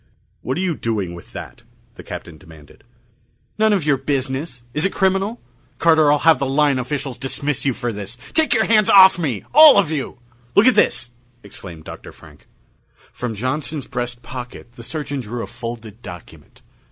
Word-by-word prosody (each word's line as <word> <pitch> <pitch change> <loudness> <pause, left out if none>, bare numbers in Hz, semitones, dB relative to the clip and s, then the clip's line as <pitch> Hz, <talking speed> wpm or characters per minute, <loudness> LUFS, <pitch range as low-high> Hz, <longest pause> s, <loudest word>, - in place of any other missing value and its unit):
"What 130 - -3
are - - -1
you 180 -4 -1
doing 105 -9 -3
with 85 - -12
that?" - - -9 0.3
the - - -12
Captain 80 -2 -9
demanded. 80 -3 -17 0.8
"None 220 0 +4
of 190 -7 +1
your 145 -3 +3
business! 135 -1 -3
Is 150 - -1
it 195 - +1
criminal? 195 +4 0 0.4
Carter, 160 -3 +4
I'll 150 - +4
have 160 +2 +4
the 135 - -1
line 140 0 +2
officials 135 +1 -4
dismiss 140 +1 -3
you 130 - +1
for 120 -3 -3
this! 105 +3 -7 0.2
Take 320 -1 +2
your 220 -2 +3
hands 215 -2 +3
off 190 -2 +8
me 130 - -2
all 305 -4 +9
of 185 -6 +3
you!" 140 -6 -4 0.4
"Look 205 - +6
at 255 - +6
this!" 120 0 +1 0.3
exclaimed 90 -5 -9
Dr. - - -10
Frank. - - -18 0.7
From 120 -3 -4
Johnson's 140 +6 -3
breast 120 -2 -5
pocket 120 -1 -9
the 120 - -13
surgeon 145 +2 -4
drew 120 0 -5
a - - -4
folded 115 -2 -8
document. 90 -1 -13
135 Hz, 175 wpm, -20 LUFS, 120-160 Hz, 0.8 s, all